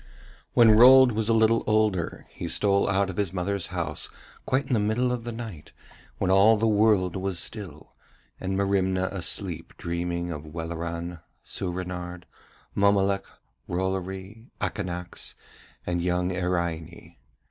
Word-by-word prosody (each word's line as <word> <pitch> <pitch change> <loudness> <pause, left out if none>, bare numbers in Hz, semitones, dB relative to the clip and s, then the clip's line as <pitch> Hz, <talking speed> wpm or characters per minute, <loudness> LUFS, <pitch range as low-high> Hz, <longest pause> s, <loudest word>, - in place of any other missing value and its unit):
When 115 -2 +7
Rold 125 +3 +8
was 110 0 -1
a - - +4
little 115 +1 +3
older 105 -5 +1
he - - -6
stole 100 -1 +2
out 95 0 +1
of 85 - -11
his 100 -4 0
mother's 95 0 -2
house - - -2 0.4
quite 130 +1 +1
in 130 - -2
the 115 - +3
middle 110 +4 +1
of 120 -2 -3
the 120 - -3
night 110 -10 -8 0.4
when 95 - 0
all 100 +4 +6
the 110 - +1
world 105 -4 +3
was 95 -1 -2
still, 85 -2 -3 0.5
and 95 0 -2
Merimna 95 -1 +1
asleep 90 -2 -3
dreaming 85 0 -3
of 75 -2 -6
Welleran, 85 +1 -5 0.3
Soorenard, 90 -1 -5 0.5
Mommolek, 100 -1 +2 0.5
Rollory, 95 +4 -4
Akanax, 90 -4 -4 0.5
and 85 -1 -1
young 90 +1 0
Iraine. 85 -2 -3
95 Hz, 135 wpm, -26 LUFS, 90-105 Hz, 0.5 s, Rold